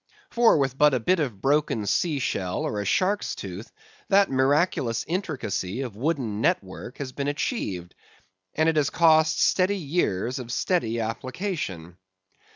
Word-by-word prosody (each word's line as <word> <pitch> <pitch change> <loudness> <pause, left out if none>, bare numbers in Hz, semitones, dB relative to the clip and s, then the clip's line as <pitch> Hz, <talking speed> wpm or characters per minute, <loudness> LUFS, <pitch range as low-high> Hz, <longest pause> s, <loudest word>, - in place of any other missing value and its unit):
For, 235 -6 +5
with 135 -2 -1
but 150 -2 +5
a - - +1
bit 180 +10 +2
of 120 -11 -3
broken 140 -6 +1
sea 150 - +1
shell 95 -8 -2
or 105 - -2
a - - -5
shark's 195 - 0
tooth, - - -8 0.4
that 200 -3 +4
miraculous 135 -3 +1
intricacy 135 - -3
of 125 -6 -5
wooden 120 -5 -2
net - - +2
work 95 +6 -10
has 135 -3 -5
been 140 +2 -4
achieved; 100 - -3 0.6
and 155 +1 +2
it 160 -1 +2
has 145 -2 +2
cost 160 -2 +4
steady 195 +2 +3
years 135 - -1
of 120 -2 -7
steady 120 -7 0
application. 115 - -4
135 Hz, 155 wpm, -25 LUFS, 110-165 Hz, 0.6 s, For